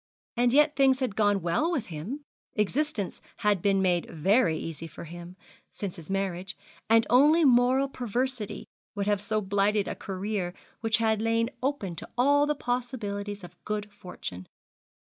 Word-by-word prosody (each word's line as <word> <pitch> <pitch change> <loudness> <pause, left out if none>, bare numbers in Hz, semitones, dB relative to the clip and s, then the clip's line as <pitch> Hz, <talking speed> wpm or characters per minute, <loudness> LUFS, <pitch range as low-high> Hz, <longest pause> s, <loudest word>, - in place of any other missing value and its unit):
And 240 0 +3
yet 295 +3 +4
things 265 -1 +4
had 250 -7 -1
gone 205 -4 +2
well 175 - +1
with 280 -10 -1
him, 205 - -5 0.3
existence 215 0 -1 0.2
had 205 -4 +3
been 195 0 +2
made 175 -2 +1
very 170 +1 +2
easy 165 0 -6
for - - -10
him, 175 +2 -9 0.4
since 195 -4 -5
his 165 0 -12
marriage; 190 -1 -2 0.3
and 225 0 +5
only 300 +6 +5
moral 255 +1 +4
perversity 250 -2 -2 0.3
would 200 -1 -1
have 205 -1 +1
so 215 +1 0
blighted 200 +1 +1
a - - -2
career 195 -1 -3 0.2
which 225 -2 +2
had 220 -2 +1
lain 230 +1 +1
open 255 -10 -2
to - - -8
all 285 +3 +4
the 300 - +1
possibilities 210 -6 -3
of 175 0 -13
good 210 -1 -3
fortune. 95 - -8
210 Hz, 160 wpm, -28 LUFS, 190-250 Hz, 0.4 s, and